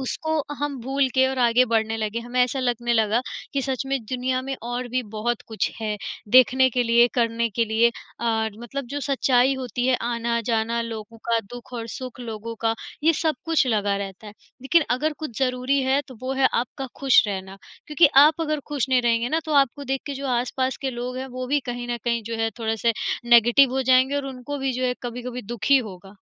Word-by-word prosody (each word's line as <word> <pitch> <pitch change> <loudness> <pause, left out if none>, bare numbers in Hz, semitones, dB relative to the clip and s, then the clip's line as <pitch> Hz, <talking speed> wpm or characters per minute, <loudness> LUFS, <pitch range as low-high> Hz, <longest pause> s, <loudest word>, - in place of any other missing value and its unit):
उसको 315 +4 -3 0.3
हम 290 -1 -2
भूल 270 +2 0
के, 260 0 +4
और 265 0 -2
आगे 245 0 +4
बढ़ने 225 -1 0
लगे। 215 +1 -2
हमें 245 +2 -2
ऐसा 250 +2 -1
लगने 240 -1 0
लगा 220 0 +2 0.3
कि 275 - 0
सच 265 -2 -2
में, 275 0 0
दुनिया 255 +2 -1
में 270 0 -4
और 245 +1 -4
भी 255 +1 -1
बहुत 235 +2 -1
कुछ 220 - -1
है, 215 -1 -2 0.3
देखने 255 +2 +6
के 250 +1 +1
लिए, 235 0 +5
करने 230 -1 +1
के 230 +3 +1
लिए, 225 +2 +3 0.3
और 220 -2 -1
मतलब 270 +2 -5
जो 290 - -3
सच्चाई 265 -1 +2
होती 250 -1 -3
है, 260 - +3
आना-जाना 235 -1 -1
लोगों 225 -1 -7
का, 230 - +3 0.2
दुःख 245 +1 -11
और 230 -1 -4
सुख 255 +1 -7
लोगों 230 -1 -6
का, 225 0 +3 0.3
ये 330 - +6
सब 310 -4 +1
कुछ 320 -5 +2
लगा 205 -4 +1
रहता 195 +1 -7
है। 205 - -9 0.3
लेकिन 330 +5 +4
अगर 300 +5 +1
कुछ 305 -8 -6
ज़रूरी 260 +1 +1
है, 265 +2 +2
तो 255 - -10
वो 260 - -2
है 270 0 +3
आपका 260 +2 -2
खुश 270 -3 +6
रहना। 190 0 -5 0.3
क्योंकि 305 +1 +5 0.2
आप 315 +2 +3
अगर 305 -2 -1
खुश 280 -3 -1
नहीं 255 -2 +3
रहेंगे 235 0 +1
ना, 320 +3 0
तो 310 - -3
आपको 275 +2 -6
देख 270 0 -2
के 285 - -4
जो 275 +1 -5
आस-पास 255 +1 -1
के 265 - -1
लोग 245 +1 -5
हैं, 260 - -4
वो 255 - -3
भी 285 +2 +1
कहीं 245 0 -5
न - - -3
कहीं, 235 -1 0
जो 230 +1 -5
है, 225 0 0
थोड़े-से 225 0 0 0.4
नेगेटिव 240 +3 +6
हो 265 - 0
जाएँगे 260 +2 +4
और 280 - -2
उनको 270 +2 -6
भी, 265 -1 -1
जो 255 +1 -2
है, 250 - 0
कभी-कभी 245 +1 -5
दुख 225 - -6
ही 275 - +8
होगा। 195 +2 -13
245 Hz, 215 wpm, -24 LUFS, 230-265 Hz, 0.4 s, ही